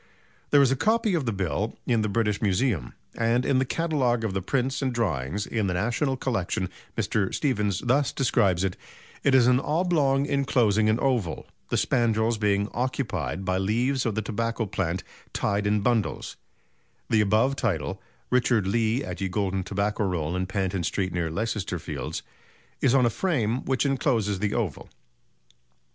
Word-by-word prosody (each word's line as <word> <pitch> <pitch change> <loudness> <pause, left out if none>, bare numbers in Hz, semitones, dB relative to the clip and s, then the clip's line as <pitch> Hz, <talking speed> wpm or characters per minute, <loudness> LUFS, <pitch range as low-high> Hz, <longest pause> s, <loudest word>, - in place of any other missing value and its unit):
There 145 -1 +6
is 135 - +3
a - - +3
copy 220 - +2
of 155 -7 0
the - - +2
bill 100 +2 -2
in 115 -3 +2
the 110 - 0
British 105 -1 0
Museum, 100 - 0 0.2
and 115 +2 +1
in 130 - +3
the 130 - +1
catalogue 130 -6 0
of 110 -4 -1
the 95 - -1
prints 135 +7 -1
and 135 -1 0
drawings 95 - -1
in 110 -3 -1
the 90 - -1
National 120 - 0
Collection 95 -7 -1 0.3
Mr. 100 -3 0
Stephens 105 - 0
thus 130 +2 +2
describes 100 -8 +2
it: 95 -2 -1 0.5
"It 135 -2 +4
is 125 -2 +6
an 125 0 +4
oblong 150 -3 +1
enclosing 120 -7 +2
an 110 +2 +2
oval, 120 -11 0 0.2
the - - 0
spandrels 115 -2 +1
being 100 -1 +2
occupied 120 - -2
by 95 0 +1
leaves 120 +7 +1
of 110 - -1
the 110 - -1
tobacco 115 +2 -2
plant 95 -3 -2 0.3
tied 100 0 0
in 105 0 +2
bundles; 115 -1 0 0.7
the 110 - +3
above 110 +7 +2
title 80 - -2 0.3
(Richard 120 -4 +3
Lee 115 +5 +1
at - - -6
Ye 95 - -1
Golden 95 -1 -1
Tobacco 100 +3 -1
Roll 90 -4 -1
in 90 0 -1
Panton 95 -1 -1
Street 95 +2 -1
near 85 -2 -1
Leicester 100 0 -2
Fields) 75 -5 -5 0.6
is 130 -1 +4
on 130 -2 +5
a 120 - +2
frame 125 - 0
which 130 +1 +1
encloses 120 -8 +1
the 105 +1 -1
oval. 105 - -3
110 Hz, 170 wpm, -26 LUFS, 95-130 Hz, 0.7 s, There